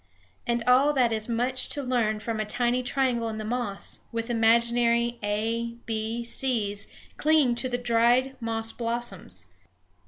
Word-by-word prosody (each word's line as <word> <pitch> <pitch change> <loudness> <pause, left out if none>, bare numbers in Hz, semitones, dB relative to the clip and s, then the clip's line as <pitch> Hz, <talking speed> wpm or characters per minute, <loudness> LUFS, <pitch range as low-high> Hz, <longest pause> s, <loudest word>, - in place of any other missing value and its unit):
And 235 0 0
all 265 +4 +5
that 250 -4 +2
is 220 +1 -1
much 250 +2 +1
to 285 - -1
learn 235 -4 0
from 225 0 -3
a - - +1
tiny 245 +3 0
triangle 250 -3 0
in 220 - -5
the 215 - -5
moss, 220 -3 -1
with 230 +1 -3
imaginary 235 +1 +2
a, 225 +3 -2
b, 225 +1 -3
c's 220 -5 -1 0.3
clinging 300 -5 +3
to 255 +2 -2
the 245 - -1
dried 245 +2 +2
moss 225 -1 -2
blossoms. 230 - -3
235 Hz, 150 wpm, -26 LUFS, 225-245 Hz, 0.3 s, all